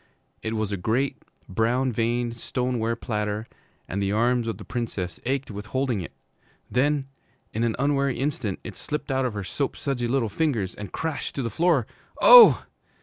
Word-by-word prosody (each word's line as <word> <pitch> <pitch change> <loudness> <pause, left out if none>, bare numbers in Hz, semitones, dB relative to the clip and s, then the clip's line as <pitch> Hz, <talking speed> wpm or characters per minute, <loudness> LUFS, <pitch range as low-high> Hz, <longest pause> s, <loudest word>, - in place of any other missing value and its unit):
It 110 0 -3
was 110 -2 -1
a 100 - -1
great 120 +9 -1 0.3
brown 120 +6 +1
veined 120 +1 -1
stoneware 120 -1 -1
platter, 105 -1 -3 0.4
and 100 +3 -3
the 100 0 0
arms 120 +2 +2
of 110 -4 -2
the 105 - -10
Princess 100 -8 -4
ached 135 -1 -1
with 105 +1 -7
holding 130 -4 -1
it. 85 - -7 0.6
Then, 140 +2 +1 0.5
in 110 - -1
an 115 -2 +1
unwary 140 -1 +1
instant, 125 -7 -2
it - - -8
slipped 150 -2 -4
out 130 0 +1
of 120 -4 -2
her 100 - -3
soapsudsy 135 +2 -2
little 130 -2 +1
fingers 110 - -1
and 100 -3 -8
crashed 160 -2 -3
to 135 - -2
the 115 - -2
floor. 160 - +2 0.3
Oh! - - +9
120 Hz, 170 wpm, -25 LUFS, 110-135 Hz, 0.6 s, Oh